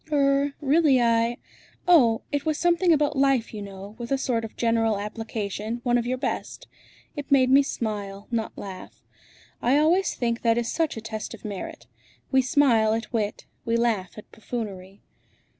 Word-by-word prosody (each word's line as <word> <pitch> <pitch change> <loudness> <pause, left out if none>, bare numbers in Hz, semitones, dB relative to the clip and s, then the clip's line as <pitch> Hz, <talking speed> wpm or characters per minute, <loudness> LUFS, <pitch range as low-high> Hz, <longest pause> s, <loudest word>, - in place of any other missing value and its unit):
"Er 280 -1 +2
really 290 -2 +4
I 230 0 +2 0.5
oh! 245 -11 +5
it 285 -1 -1
was 310 0 0
something 345 +1 +3
about 295 -2 +2
life, 270 -4 +2
you 210 - -6
know, 200 0 -9
with 235 +1 -6
a 275 - +3
sort 240 -4 -1
of 225 - -8
general 225 -2 +1
application, 215 +1 -4
one 245 -1 +2
of 240 -1 +1
your 255 +1 -1
best. - - -4 0.5
It 290 -2 -7
made 260 -2 +5
me 275 +1 +7
smile, 205 -6 -4
not 225 -2 -2
laugh. 190 -2 -9 0.6
I 255 +4 +3
always 340 +5 +2
think 235 -1 -1
that 230 -1 +2
is 235 -1 -1
such 320 -7 -1
a - - -5
test 220 -1 -6
of - - -16
merit. 200 -3 -6 0.5
We 265 -1 +5
smile 240 -5 +3
at 230 +2 -5
wit; 215 -3 -2 0.2
we 230 0 0
laugh 220 -6 -1
at 215 - -12
buffoonery." 200 -4 -7
235 Hz, 175 wpm, -25 LUFS, 220-275 Hz, 0.6 s, me